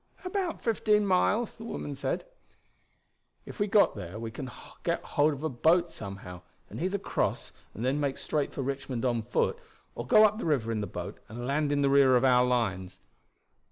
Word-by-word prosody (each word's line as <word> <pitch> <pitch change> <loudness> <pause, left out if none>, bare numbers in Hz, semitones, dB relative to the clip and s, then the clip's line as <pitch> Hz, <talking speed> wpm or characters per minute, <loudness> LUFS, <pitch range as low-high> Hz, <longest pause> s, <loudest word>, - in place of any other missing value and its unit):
"About 365 -2 -2
fifteen 210 -2 +2
miles," 200 +4 +1
the 225 - -9
woman 150 -10 -5
said. 140 - -3 1.2
"If - - -10
we 205 - +2
got 205 0 +4
there 90 +4 -7
we 115 0 -5
can 130 +2 -6 0.3
get - - -1
hold 150 +2 +2
of 145 0 -6
a - - +1
boat 165 +7 +3
somehow, 95 -3 -8 0.3
and - - -6
either 190 +3 0
cross 195 - -2 0.2
and 115 - -3
then 135 +3 +1
make 140 -2 -1
straight 150 -2 -1
for 135 - -4
Richmond 135 -2 -3
on 120 -2 +1
foot, 110 - 0 0.3
or - - -6
go 215 - +7
up 215 +1 +1
the - - -4
river 130 -8 +1
in 110 -2 -1
the 105 - -3
boat 90 +3 -7
and 120 +3 -6
land 145 +2 0
in 145 0 +2
the - - +4
rear 135 -2 +6
of 125 - +3
our 125 -1 +5
lines. 95 -7 -1
135 Hz, 195 wpm, -29 LUFS, 115-180 Hz, 1.2 s, go